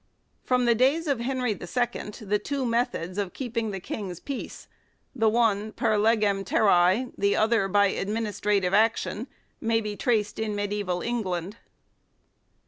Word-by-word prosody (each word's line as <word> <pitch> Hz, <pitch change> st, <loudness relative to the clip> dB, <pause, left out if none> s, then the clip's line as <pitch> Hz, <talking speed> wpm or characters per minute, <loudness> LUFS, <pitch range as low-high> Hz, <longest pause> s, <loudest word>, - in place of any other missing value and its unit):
From 250 Hz, -1 st, +2 dB
the 235 Hz, -, +5 dB
days 270 Hz, +8 st, +2 dB
of 280 Hz, -5 st, 0 dB
Henry 250 Hz, -1 st, -1 dB
II, 205 Hz, -, -3 dB, 0.7 s
the 210 Hz, 0 st, 0 dB
two 275 Hz, -2 st, -2 dB
methods 230 Hz, -6 st, -1 dB
of 195 Hz, -3 st, -3 dB
keep 245 Hz, -3 st, -6 dB
ing 230 Hz, -1 st, 0 dB
the 195 Hz, -2 st, -4 dB
King's 185 Hz, -2 st, -6 dB
peace 280 Hz, -2 st, -7 dB, 0.5 s
the 225 Hz, -3 st, +3 dB
one 215 Hz, -2 st, +1 dB
"per 215 Hz, -, +1 dB
legem 210 Hz, -2 st, +2 dB
terrae," 195 Hz, +4 st, +3 dB
the 200 Hz, 0 st, +2 dB
other 220 Hz, -2 st, +2 dB
by 205 Hz, +1 st, +4 dB
administrative 205 Hz, -2 st, -1 dB
action 220 Hz, +2 st, +1 dB, 0.3 s
may 225 Hz, 0 st, +1 dB
be 210 Hz, -2 st, -4 dB
traced 215 Hz, -2 st, 0 dB
in 215 Hz, -1 st, -2 dB
mediaeval 205 Hz, -3 st, -2 dB
England. 200 Hz, -4 st, -3 dB
215 Hz, 145 wpm, -26 LUFS, 200-235 Hz, 0.7 s, the